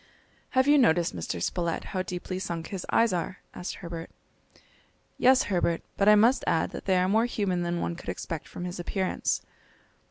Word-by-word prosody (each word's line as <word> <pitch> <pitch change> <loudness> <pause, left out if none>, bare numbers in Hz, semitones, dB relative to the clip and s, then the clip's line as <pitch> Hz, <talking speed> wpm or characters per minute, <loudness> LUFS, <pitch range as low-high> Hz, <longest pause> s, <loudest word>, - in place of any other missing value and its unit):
"Have 260 +1 +5
you 295 0 +6
noticed, 170 - +3
Mr. 85 +1 -4
Spilett, 170 - -1
how 185 - 0
deeply 185 0 -4
sunk 170 -3 -4
his 190 -3 -5
eyes 230 -3 +3
are?" 180 +1 -2 0.2
asked 180 - -5
Herbert. 170 -2 -7 1.1
"Yes, 260 +1 +6
Herbert; 175 -3 0
but 200 +1 +4
I 210 - +8
must 230 +5 +4
add 160 - +1
that - - -7
they 190 -1 +3
are 180 0 +3
more 220 +4 +3
human 195 -6 -1
than 175 0 -1
one 170 - -2
could - - -8
expect 160 -2 -5
from 175 - -7
his 180 0 -5
appearance." 185 +2 -1
180 Hz, 185 wpm, -28 LUFS, 170-205 Hz, 1.1 s, I